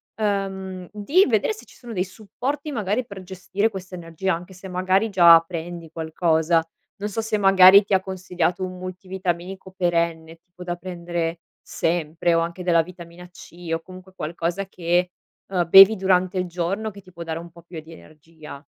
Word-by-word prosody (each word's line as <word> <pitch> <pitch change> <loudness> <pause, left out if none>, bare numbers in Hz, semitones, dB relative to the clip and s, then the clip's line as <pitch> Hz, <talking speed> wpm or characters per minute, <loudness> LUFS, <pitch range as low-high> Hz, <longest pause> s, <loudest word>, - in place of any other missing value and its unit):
ehm, 190 -3 -3
di 280 - +2
vedere 225 - +1
se 435 - -13
ci - - -19
sono 240 -2 -10
dei 185 -2 -1
supporti 250 +10 -5
magari 220 0 -1
per 200 -4 -10
gestire 190 +3 -2
questa 190 -3 -9
energia, 175 +2 -3
anche 175 +3 -7
se 190 +2 -10
magari 185 +4 +1
già 170 -3 +8
prendi 165 -1 -7
qualcosa. 165 0 +1 0.3
Non 205 - -4
so 220 +2 -2
se 220 -1 -1
magari 195 0 +7
ti 200 - -3
ha 190 - +5
consigliato 185 -1 -2
un 185 0 -8
multivitaminico 185 0 -5
perenne, 170 -2 -1
tipo 180 +1 -14
da 175 -1 -3
prendere 170 -1 -4 0.2
sempre, 165 0 -1
o 165 - +3
anche 170 +2 -4
della 170 -2 +4
vitamina 175 0 -11
C, 175 -1 -12
o 165 - -5
comunque 185 +1 -13
qualcosa 170 +4 -3
che, 180 -1 -1 0.4
uhm, 180 -3 -1
bevi 195 +4 +10
durante 185 -1 +1
il 180 - -1
giorno 180 +5 -2
che 200 -1 -13
ti 185 -1 -18
può 170 - -12
dare 165 -1 -4
un 170 0 -9
po' 170 0 -16
più 170 0 -9
di 160 +1 -13
energia. 155 -2 -13
180 Hz, 180 wpm, -23 LUFS, 170-195 Hz, 0.4 s, bevi